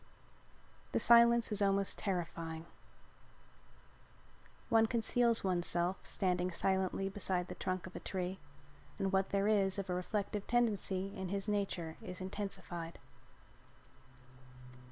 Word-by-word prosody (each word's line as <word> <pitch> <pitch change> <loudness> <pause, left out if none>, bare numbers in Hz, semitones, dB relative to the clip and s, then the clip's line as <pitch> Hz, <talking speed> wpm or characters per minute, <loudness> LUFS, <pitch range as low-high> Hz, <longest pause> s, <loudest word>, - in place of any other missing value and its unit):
The - - +3
silence 235 -1 +6
is 210 0 0
almost 195 -1 +2
terrifying. 165 -4 -3 2.0
One 225 0 +4
conceals 235 0 +2
oneself 175 0 +1
standing 180 -2 0
silently 190 +2 0
beside 190 -2 -1
the - - -4
trunk 185 -1 -2
of 180 - -10
a - - -4
tree 185 0 -3 0.6
and 195 0 0
what 190 0 +2
there 200 0 +1
is 200 -2 +3
of 195 -2 -3
a - - +1
reflective 205 +3 -2
tendency 200 -4 0
in 190 -2 -4
his 200 +1 -2
nature 195 -6 -2
is 180 -1 -7
intensified. 185 -3 -5
195 Hz, 115 wpm, -35 LUFS, 180-205 Hz, 2.0 s, silence